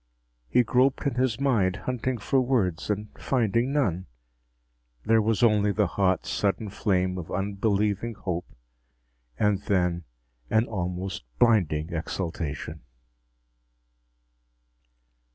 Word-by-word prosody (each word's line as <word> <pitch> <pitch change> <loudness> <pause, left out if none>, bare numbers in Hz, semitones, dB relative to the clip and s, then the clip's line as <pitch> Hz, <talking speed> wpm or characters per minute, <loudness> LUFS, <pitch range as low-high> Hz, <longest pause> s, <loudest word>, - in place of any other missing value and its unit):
He 125 - +4
groped 130 +4 +2
in 140 - +1
his 125 -1 0
mind, 110 -10 +2
hunting 125 0 -1
for 130 +5 +1
words, 110 -11 0
and 105 0 -2
finding 120 0 +1
none. 95 - 0 1.0
There 115 0 +4
was 110 +2 +1
only 105 -3 +4
the 105 0 +2
hot, 95 0 +1
sudden 105 +1 -1
flame 95 -2 0
of 85 - -8
unbelieving 100 +3 0
hope. 90 -4 -4 0.9
And 105 +2 +2
then 90 -4 0 0.4
an 110 +1 +3
almost 90 -2 -4 0.2
blinding 85 -8 +2
exultation. 80 -2 -4
105 Hz, 105 wpm, -26 LUFS, 90-115 Hz, 1.0 s, He